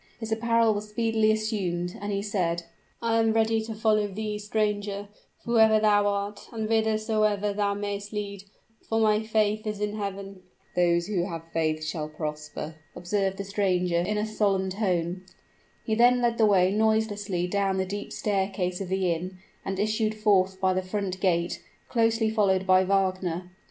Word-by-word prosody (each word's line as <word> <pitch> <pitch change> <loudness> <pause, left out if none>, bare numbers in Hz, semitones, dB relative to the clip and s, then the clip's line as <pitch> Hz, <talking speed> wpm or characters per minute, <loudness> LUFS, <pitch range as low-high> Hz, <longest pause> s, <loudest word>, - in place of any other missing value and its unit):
His 225 -1 -6
apparel 230 0 +3
was 210 +1 -5
speedily 220 0 +1
assumed; 190 -5 -2
and 205 0 -3
he 200 0 -1
said, 175 -5 -1 0.4
"I 230 0 +2
am 225 -1 +3
ready 225 0 +2
to 220 0 -6
follow 215 -1 +2
thee, 210 +1 -4
stranger, 205 -1 -2 0.4
whoever 220 -2 +5
thou 205 -1 +4
art, 200 0 -3
and 220 -2 -3
whithersoever 215 -2 +1
thou 200 0 0
mayst 205 0 -4
lead; 200 -2 -5 0.4
for 225 - +1
my 215 -1 +3
faith 215 -1 0
is 210 -1 -3
in 210 0 -1
Heaven." 195 -1 -5 0.3
"Those 170 -1 +3
who 190 -4 -1
have 165 -3 -5
faith 155 -1 0
shall 155 -1 -3
prosper," 155 0 -6 0.2
observed 195 +1 -1
the 200 - -3
stranger, 185 -3 +1
in 205 +5 -1
a 210 - 0
solemn 200 -3 0
tone. 185 -3 -1 0.6
He 220 - 0
then 245 +2 +5
led 235 -1 0
the 220 - +6
way 190 -2 +4
noiselessly 210 -3 +1
down 195 +1 0
the 190 - 0
steep 205 +2 -5
staircase 190 -2 -1
of 190 - -5
the 190 -2 +1
inn, 180 +3 -6 0.3
and 195 -1 -3
issued 215 +1 0
forth 190 -3 +2
by 190 -1 +2
the 185 - 0
front 185 0 -3
gate, 170 -3 0 0.3
closely 225 -1 +2
followed 195 -4 +2
by 185 0 +5
Wagner. 185 -2 0
205 Hz, 165 wpm, -27 LUFS, 185-215 Hz, 0.6 s, the